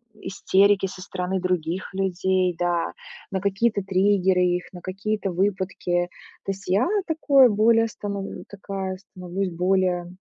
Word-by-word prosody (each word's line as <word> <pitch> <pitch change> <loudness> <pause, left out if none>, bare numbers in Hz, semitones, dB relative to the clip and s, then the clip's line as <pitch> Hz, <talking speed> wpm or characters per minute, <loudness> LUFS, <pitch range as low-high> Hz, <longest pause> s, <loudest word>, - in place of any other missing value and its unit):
истерики 195 0 +2
со 185 0 -9
стороны 185 +1 -3
других 180 0 -2
людей, 185 -1 +1
да, 175 -1 0 0.4
на 190 - -1
какие-то 200 +2 +1
триггеры 190 -1 +2
их, 180 0 +1
на 180 - -9
какие-то 195 +2 -3
выпадки. 180 -1 -1 0.4
То - - -1
есть, 195 0 -9
я 195 +7 +2 0.2
такой 285 -5 +5
более 225 +2 +4
становлю 200 -2 -6
такая 195 -2 -5
становлюсь 185 0 -5
более 180 0 0
190 Hz, 130 wpm, -24 LUFS, 180-200 Hz, 0.4 s, такой